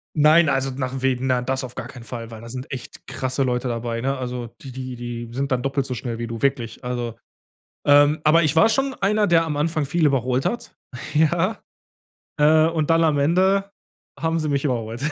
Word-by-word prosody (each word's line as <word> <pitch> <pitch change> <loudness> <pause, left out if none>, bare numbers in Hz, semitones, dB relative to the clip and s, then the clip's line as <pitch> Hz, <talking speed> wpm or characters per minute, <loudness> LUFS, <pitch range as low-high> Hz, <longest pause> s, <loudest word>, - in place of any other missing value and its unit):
Nein, 155 +1 +5
also 135 -1 0
nach 130 0 -4
Wegen 130 -1 0
na 125 -1 +2
das 130 +2 -2
auf 125 -1 -7
gar 115 - -5
keinen 130 -3 -11
Fall, 115 0 -7
weil 110 -1 -9
da 115 - -10
sind 130 +2 -7
echt 130 -3 -8
krasse 130 +1 -2
Leute 125 0 -1
dabei, 115 -1 -3
ne? 135 +2 -1
Also, 125 -1 -4
die 135 - -9
die 130 0 -6
die 120 -1 -6
sind 135 +3 -3
dann 125 -1 +1
doppelt 135 0 -1
so 130 - -4
schnell 120 -1 -4
wie 115 0 -4
du, 115 -1 -6
wirklich. 125 -5 -1
Also 120 -2 -3 0.7
ähm, 145 +1 +6
aber 165 +2 +5
ich 155 0 +1
war 165 +8 +6
schon 270 +3 0
einer, 210 +1 +1
der 170 -2 +4
am 150 -2 -3
Anfang 155 0 0
viel 160 +4 +1
überholt 130 -2 +1
hat, 240 - -3 0.4
ja? 165 +7 +2 0.8
Äh, 155 +1 +5
und 160 -2 -1
dann 165 0 +4
am 155 -3 +2
Ende 190 +6 +2 0.5
haben 165 0 0
sie 155 -1 -2
mich 140 0 0
überholt. 115 -3 -2
135 Hz, 210 wpm, -22 LUFS, 125-155 Hz, 0.8 s, ähm